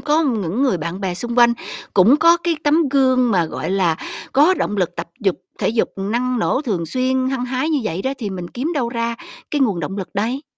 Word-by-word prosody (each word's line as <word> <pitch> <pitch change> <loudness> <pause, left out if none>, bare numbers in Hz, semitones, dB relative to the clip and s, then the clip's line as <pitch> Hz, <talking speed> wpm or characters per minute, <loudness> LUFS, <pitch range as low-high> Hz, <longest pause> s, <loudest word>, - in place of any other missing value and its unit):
có 310 +2 +2
những 220 - -1
người 215 -11 +2
bạn 170 +4 -5
bè 190 -3 -2
xung 235 +6 -3
quanh 235 0 +6 0.4
cũng 205 +8 +6
có 335 +2 +5
cái 340 -2 -1
tấm 305 +1 +3
gương 260 -2 +3
mà, 180 -5 +3
gọi 160 - -4
là, 185 -4 +2 0.4
có 300 +7 +5
động 210 - -2
lực 180 -4 -1
tập - - -5
dục 195 -4 +1 0.2
thể - - 0
dục 225 +1 +1
năng 240 +5 -1
nổ, 260 +5 0
thường 190 - -2
xuyên, 255 +6 0
hăng 255 -2 -2
hái 255 +4 -1
như 300 - +2
vậy 185 -2 -2
đó 265 - -1
thì 215 -5 -4
mình 180 -2 -6
kiếm 285 +8 -3
đâu 255 -5 0
ra 235 -1 -2 0.4
cái 295 - 0
nguồn 210 -10 +1
động 170 +5 -4
lực 190 - -5
đây? 235 +8 -1
240 Hz, 235 wpm, -20 LUFS, 195-270 Hz, 0.4 s, quanh